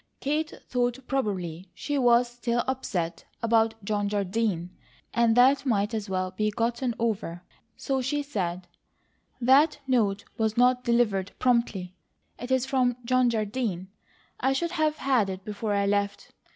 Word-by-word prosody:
Kate 305 +3 -1 0.2
thought 245 -1 0
probably 190 - -3
she 290 - -3
was 245 -2 +4
still 240 0 -1
upset 185 -10 -2 0.2
about 225 -1 +3
John 205 -1 0
Jardine, 200 -3 -1 0.4
and 235 0 +3
that 270 +3 +5
might 215 -4 0
as 215 -2 -3
well 185 -1 -1
be 215 +3 0
gotten 235 +3 -1
over, 205 -7 -2 0.3
so 270 -1 -1
she 290 +3 -1
said: 185 -10 -3 0.7
"That 265 +6 +5
note 215 -7 +1
was 220 0 0
not 250 +1 +4
delivered 210 -5 +1
promptly. 235 -7 +1 0.5
It 245 - -6
is 260 -1 +2
from 255 -2 +1
John 255 0 +3
Jardine. 215 -4 -2 0.5
I 265 +1 +2
should 340 +5 -1
have 310 -3 +1
had 250 -7 +2
it 190 0 -6
before 210 0 -3
I 200 0 +1
left. 200 0 -1
230 Hz, 145 wpm, -27 LUFS, 200-255 Hz, 0.7 s, that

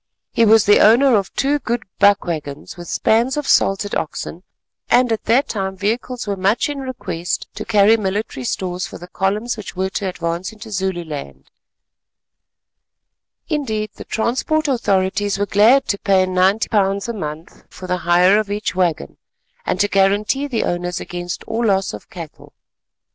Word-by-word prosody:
He 230 - +3
was 220 0 +5
the 205 - +6
owner 240 +4 +6
of 195 -3 0
two 285 +2 +1
good 240 -3 -2 0.2
buck 200 0 +4
waggons 150 -4 -5
with 175 -1 -10
spans 235 - +1
of 295 - -3
salted 195 +1 +2
oxen, 165 +2 -4 0.5
and 245 -1 +4
at 225 - -2
that 245 +6 +3
time 190 -2 -3
vehicles 230 +5 -2
were 200 -1 -2
much 195 +8 +1
in 290 -1 -4
request 250 -10 -4
to - - -6
carry 210 0 +5
military 200 - -3
stores 180 +7 -3
for - - -9
the 175 - -11
columns 210 +6 -1
which 210 -3 -8
were 190 +1 -1
to 195 -1 -2
advance 170 +1 -3
into 220 0 -11
Zululand; 170 - -4 2.0
indeed 220 -8 -2
the - - -10
transport 265 +8 0
authorities 205 -5 0
were 205 - 0
glad 225 +7 +4
to 200 - 0
pay 190 -3 +3
£90 195 +2 +1
a 235 - -3
month 155 -5 -7
for 185 - -10
the 180 0 -1
hire 180 +4 +4
of 215 -2 -3
each 205 +1 -2
waggon 175 - -1 0.5
and 185 - 0
to 205 - +3
guarantee 205 +8 +1
the 240 -5 -1
owners 175 0 -2
against 175 0 -6
all 225 +1 -1
loss 195 -2 +1
of - - -10
cattle. 170 -7 -10
200 Hz, 165 wpm, -19 LUFS, 180-225 Hz, 2.0 s, the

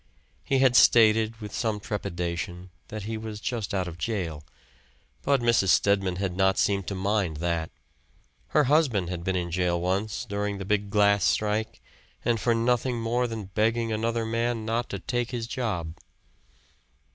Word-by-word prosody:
He 135 - +1
had 130 -2 +4
stated, 110 -2 +5
with 105 -1 -7
some 110 -3 -1
trepidation, 90 -2 -4 0.2
that 110 -1 -6
he 110 +2 -4
was 110 -1 -6
just 115 -2 -3
out 95 -2 -1
of 85 0 -8
jail; 85 -10 -3 0.8
but 140 -2 +2
Mrs. 115 -4 +3
Stedman 95 -1 +3
had 95 -1 -2
not 95 0 +2
seemed 100 -2 +1
to 100 - -3
mind 95 -4 0
that. 85 0 -1 0.8
Her 150 - +3
husband 130 - +2
had 85 -2 -4
been 95 +1 -1
in 85 -1 -2
jail 90 0 +1
once, 95 +4 -1
during 100 0 -2
the 95 - -6
big 105 0 0
glass 100 -1 +3
strike, 105 +3 0 0.4
and 115 -1 +2
for 115 +1 +2
nothing 120 +1 +1
more 120 +2 0
than 110 -4 -6
begging 115 +1 +1
another 115 +1 -1
man 115 0 -1
not 115 +2 -1
to - - -3
take 120 -1 -2
his 120 -2 -3
job. 105 -11 -3
105 Hz, 165 wpm, -26 LUFS, 95-115 Hz, 0.8 s, stated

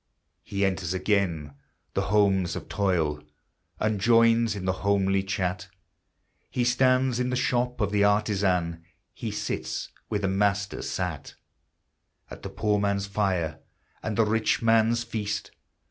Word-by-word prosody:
He 100 0 -1
enters 95 -2 -1
again 90 -7 0 0.4
the - - 0
homes 100 -3 +2
of - - -6
toil, 85 -8 0 0.6
And 110 -2 0
joins 115 0 +4
in 95 -2 -5
the 95 - +2
homely 100 -1 +2
chat; 90 -2 -2 0.8
He 125 - -1
stands 130 0 +3
in 125 0 0
the 125 - 0
shop 125 0 0
of 105 -3 0
the 105 -1 +3
artisan; 95 -5 +1 0.3
He - - -5
sits, - - -4 0.2
where 105 - -1
the 100 - 0
Master 100 +1 0
sat, 90 -5 -4 1.0
At - - -9
the - - -6
poor 105 -1 0
man's 100 -1 0
fire 95 -6 -1 0.4
and 110 -2 -3
the 115 - +4
rich 110 +1 +1
man's 115 +1 +3
feast. 105 -3 -4
100 Hz, 140 wpm, -26 LUFS, 95-110 Hz, 1.0 s, joins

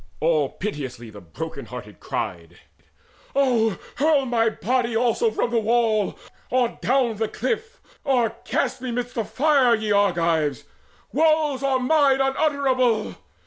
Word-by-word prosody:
All 155 -4 +2
piteously 130 - -6
the 105 -1 -11
broken 80 -3 -7
hearted - - -9
cried: 85 -2 -5 0.8
"Oh 240 -6 +2 0.2
hurl 290 -1 +3
my 230 -2 +2
body 240 +1 -1
also 245 - +2
from 405 - -1
the 235 - +2
wall, 225 -2 +1 0.3
Or 250 -2 0
down 245 -3 +1
the 220 +1 0
cliff, 460 - -3 0.2
or 255 -6 +2
cast - - -1
me 255 - -4
midst 245 +1 -3
the 230 - -1
fire, 270 -1 +3
Ye 215 -1 -3
Argives! 170 -7 +1 0.5
Woes 310 -3 +2
are 275 -1 +2
mine 275 0 +3
unutterable! 270 -5 +1
240 Hz, 135 wpm, -23 LUFS, 210-275 Hz, 0.8 s, hurl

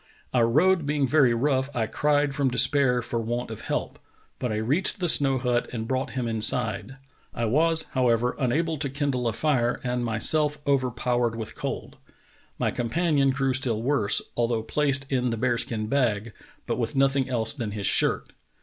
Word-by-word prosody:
"Our 120 -2 +3
road 160 +5 +2
being 145 -1 +1
very 135 -4 +3
rough, 130 +2 0
I 115 -2 0
cried 145 +3 0
from 140 -2 0
despair 125 -1 +2
for 120 0 -3
want 120 +1 -4
of 110 - -7
help; - - -4 0.4
but 125 - -2
I - - -2
reached 135 - 0
the 180 - 0
snow 135 -4 +3
hut 125 -1 -1
and 115 -2 -5
brought 130 +1 -2
him 125 -2 -1
inside. 110 +1 +1 0.4
I 115 - -1
was, 160 +7 +4
however, 125 -2 +1
unable 155 +4 0
to 145 -2 -1
kindle 135 -3 -2
a - - -4
lire 125 -6 +1
and 125 0 -2
was - - -2
myself 150 +7 +3
overpowered 125 -3 0
with 110 -1 -6
cold. - - -6 0.6
My - - 0
companion 140 +3 0
grew 135 0 0
still 120 -4 -1
worse, 125 -6 +2
although 115 -2 0
placed 140 +3 0
in 125 -2 0
the 115 - -2
bear 120 0 0
skin 110 -3 -3
bag, 115 -3 -1 0.3
but - - -3
with - - -3
nothing 135 -1 +2
else 115 -3 -2
than 120 -7 -4
his 105 -1 -5
shirt. - - +2
125 Hz, 180 wpm, -25 LUFS, 115-140 Hz, 0.6 s, was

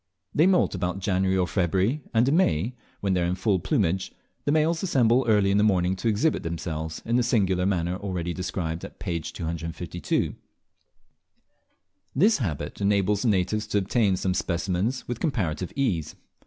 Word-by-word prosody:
They 160 +4 +4
moult 185 -2 +3
about 90 -1 -2
January 95 0 +1
or 90 - +2
February, 95 - 0
and 115 +1 +3
in 140 - +3
May, 115 - +2 0.3
when 100 -1 +1
they 90 - +1
are - - +1
in 90 - 0
full 95 0 +1
plumage, 95 - 0 0.3
the 145 - +2
males 160 +2 +2
assemble 130 -8 +3
early 105 -3 +4
in 100 - +3
the - - +4
morning 95 -3 +2
to 115 - -2
exhibit 115 +9 +2
themselves 80 -1 -4
in 115 +1 +1
the - - +3
singular 95 -7 +2
manner 90 -2 0
already 90 -4 -3
described 85 -3 -3
at - - -9
p. 85 -1 -2
252. 85 +2 -3 1.8
This 205 - +4
habit 75 - -4
enables 100 0 +2
the - - 0
natives 105 +1 +1
to 105 - 0
obtain 100 0 +2
specimens 90 +5 -1
with 120 -1 -4
comparative 95 - -1
ease. 95 - -1
95 Hz, 165 wpm, -26 LUFS, 90-115 Hz, 1.8 s, They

